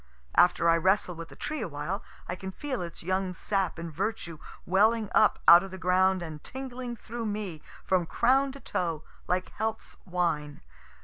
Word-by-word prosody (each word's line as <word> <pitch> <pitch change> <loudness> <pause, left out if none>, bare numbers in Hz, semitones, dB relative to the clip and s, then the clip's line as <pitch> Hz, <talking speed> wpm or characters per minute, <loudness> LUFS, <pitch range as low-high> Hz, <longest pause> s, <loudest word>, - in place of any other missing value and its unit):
After 175 -1 +5
I 165 0 +5
wrestle 185 +1 +2
with 165 0 -8
the - - -13
tree 305 -3 -4
awhile, 180 +2 -3 0.3
I 180 - -3
can 190 +1 -6
feel 260 +4 -4
its 170 -1 -7
young 185 +1 -1
sap 195 0 -1
and 165 -1 -6
virtue 170 -3 -3 0.3
welling 215 +4 +3
up 215 - +5
out 170 +1 +10
of 195 - -6
the 190 - -8
ground 185 0 +2
and 155 -3 -8
tingling 255 -2 -6
through 230 0 -5
me 205 -7 -4 0.2
from 180 -3 +2
crown 265 +7 +3
to 275 - -10
toe, 165 - -2 0.2
like 180 +1 0
health's 220 0 -4
wine. 165 -5 -1
185 Hz, 175 wpm, -28 LUFS, 170-220 Hz, 0.3 s, out